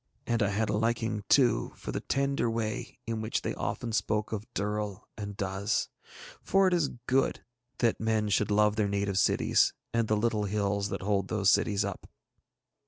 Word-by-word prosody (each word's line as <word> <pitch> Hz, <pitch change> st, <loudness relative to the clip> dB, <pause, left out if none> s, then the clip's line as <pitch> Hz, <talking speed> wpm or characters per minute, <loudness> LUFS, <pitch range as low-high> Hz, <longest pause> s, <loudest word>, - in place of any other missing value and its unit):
And 115 Hz, -1 st, 0 dB
I 105 Hz, -, +3 dB
had 105 Hz, +2 st, 0 dB
a -, -, -1 dB
liking 110 Hz, -1 st, 0 dB
too 125 Hz, -5 st, +3 dB
for -, -, -6 dB
the -, -, -2 dB
tender 140 Hz, -3 st, 0 dB
way 115 Hz, -2 st, -3 dB
in 115 Hz, -1 st, -3 dB
which 110 Hz, +1 st, -2 dB
they -, -, -2 dB
often 120 Hz, -, -3 dB
spoke 105 Hz, 0 st, 0 dB
of 110 Hz, +2 st, -5 dB
Durl 105 Hz, -1 st, -2 dB
and 100 Hz, -2 st, -6 dB
Duz, 100 Hz, +2 st, -1 dB, 0.5 s
for 195 Hz, 0 st, +3 dB
it 185 Hz, -, +2 dB
is 165 Hz, -5 st, +2 dB, 0.2 s
good 135 Hz, +1 st, +1 dB, 0.3 s
that 115 Hz, -2 st, +1 dB
men 110 Hz, -1 st, +1 dB
should 105 Hz, 0 st, +2 dB
love 105 Hz, +1 st, +3 dB
their 105 Hz, -2 st, +1 dB
native 100 Hz, -1 st, 0 dB
cities -, -, +3 dB, 0.2 s
and 115 Hz, -1 st, +1 dB
the 110 Hz, -, +2 dB
little 105 Hz, -1 st, +1 dB
hills 100 Hz, 0 st, 0 dB
that -, -, -4 dB
hold 100 Hz, -1 st, +1 dB
those 100 Hz, -2 st, +3 dB
cities 100 Hz, -1 st, +2 dB
up. 100 Hz, -2 st, -6 dB
105 Hz, 180 wpm, -29 LUFS, 100-115 Hz, 0.5 s, I